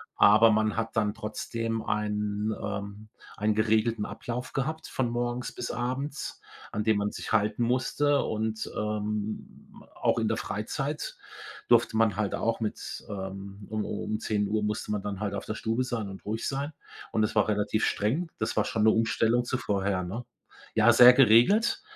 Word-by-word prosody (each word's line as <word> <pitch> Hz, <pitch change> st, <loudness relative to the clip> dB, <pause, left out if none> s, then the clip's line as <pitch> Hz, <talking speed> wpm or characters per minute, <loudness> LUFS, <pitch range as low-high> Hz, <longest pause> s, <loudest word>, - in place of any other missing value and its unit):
aber 110 Hz, +2 st, +7 dB
man 110 Hz, 0 st, +1 dB
hat 115 Hz, 0 st, -2 dB
dann 105 Hz, -2 st, +1 dB
trotzdem 115 Hz, +1 st, -3 dB
einen 105 Hz, 0 st, -1 dB
ähm, 100 Hz, +1 st, -5 dB, 0.3 s
einen 105 Hz, +1 st, +1 dB
geregelten 110 Hz, 0 st, +2 dB
Ablauf 125 Hz, +2 st, -5 dB
gehabt 155 Hz, +4 st, -2 dB
von 125 Hz, -3 st, -1 dB
morgens 120 Hz, +1 st, -2 dB
bis 120 Hz, -, -5 dB
abends, 135 Hz, +4 st, -4 dB, 0.3 s
an 105 Hz, -, -2 dB
den 110 Hz, -1 st, +3 dB
man 105 Hz, 0 st, -1 dB
sich -, -, -7 dB
halten 105 Hz, +3 st, +2 dB
musste. 130 Hz, +4 st, +1 dB
Und, 110 Hz, 0 st, -2 dB
ähm, 105 Hz, 0 st, -4 dB
auch -, -, +1 dB
in -, -, 0 dB
der -, -, 0 dB
Freizeit -, -, -3 dB, 0.5 s
durfte 110 Hz, -, +4 dB
man 110 Hz, -3 st, +3 dB
halt 105 Hz, -2 st, -1 dB
auch 115 Hz, 0 st, -1 dB
mit 110 Hz, -, -4 dB
ähm, 100 Hz, 0 st, -7 dB
um 110 Hz, 0 st, -2 dB
um 105 Hz, -, -4 dB
um 110 Hz, -, -1 dB
10 105 Hz, -2 st, 0 dB
Uhr 105 Hz, +1 st, 0 dB
musste 105 Hz, 0 st, -2 dB
man 105 Hz, -2 st, -2 dB
dann 100 Hz, -2 st, -4 dB
halt 100 Hz, -1 st, -2 dB
auf -, -, -5 dB
der 110 Hz, -, -4 dB
Stube 115 Hz, +3 st, -1 dB
sein 115 Hz, -5 st, -3 dB
und 95 Hz, -, -10 dB
ruhig 110 Hz, +2 st, -2 dB
sein. 140 Hz, +3 st, -3 dB, 0.4 s
Und 110 Hz, -, +1 dB
das 110 Hz, -, 0 dB
war 105 Hz, -, +3 dB
relativ 105 Hz, +1 st, +1 dB
streng. 145 Hz, +12 st, 0 dB
Das 110 Hz, -, -1 dB
war 105 Hz, -, +3 dB
schon 110 Hz, -, 0 dB
'ne 110 Hz, -, +7 dB
Umstellung 115 Hz, +2 st, +2 dB
zu 130 Hz, -, -1 dB
vorher, 100 Hz, -2 st, 0 dB
ne? 105 Hz, +8 st, -5 dB, 0.5 s
Ja, 110 Hz, +1 st, +6 dB
sehr 125 Hz, +1 st, +10 dB
geregelt. 130 Hz, -, +5 dB
110 Hz, 180 wpm, -28 LUFS, 105-120 Hz, 0.5 s, sehr